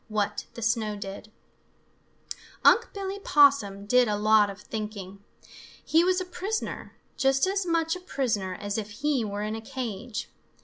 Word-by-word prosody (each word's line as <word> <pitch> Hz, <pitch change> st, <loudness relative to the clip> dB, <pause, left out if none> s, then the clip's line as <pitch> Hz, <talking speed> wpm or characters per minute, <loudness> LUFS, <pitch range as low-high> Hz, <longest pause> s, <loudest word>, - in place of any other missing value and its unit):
XIX 220 Hz, -, -16 dB
WHAT 205 Hz, -1 st, -1 dB
THE 235 Hz, -, -7 dB
SNOW 220 Hz, -1 st, 0 dB
DID 200 Hz, +1 st, -8 dB, 1.3 s
Unc' 470 Hz, -, +6 dB
Billy 395 Hz, 0 st, -5 dB
Possum 275 Hz, -, +4 dB
did 250 Hz, +3 st, +4 dB
a 210 Hz, -1 st, 0 dB
lot 215 Hz, 0 st, +4 dB
of 200 Hz, 0 st, -8 dB
thinking. 205 Hz, -3 st, -6 dB, 0.6 s
He 325 Hz, +2 st, +4 dB
was 365 Hz, +1 st, +2 dB
a 370 Hz, -, -3 dB
prisoner, 385 Hz, +4 st, -4 dB, 0.2 s
just 270 Hz, +2 st, +3 dB
as 385 Hz, -1 st, -1 dB
much 330 Hz, -1 st, +1 dB
a -, -, -7 dB
prisoner 225 Hz, -, -2 dB
as 205 Hz, +2 st, -3 dB
if 210 Hz, -1 st, -6 dB
he 290 Hz, -5 st, +2 dB
were 205 Hz, -1 st, -3 dB
in 215 Hz, +1 st, -3 dB
a 225 Hz, -, -6 dB
cage. 230 Hz, -1 st, -5 dB
225 Hz, 165 wpm, -27 LUFS, 205-315 Hz, 1.3 s, Unc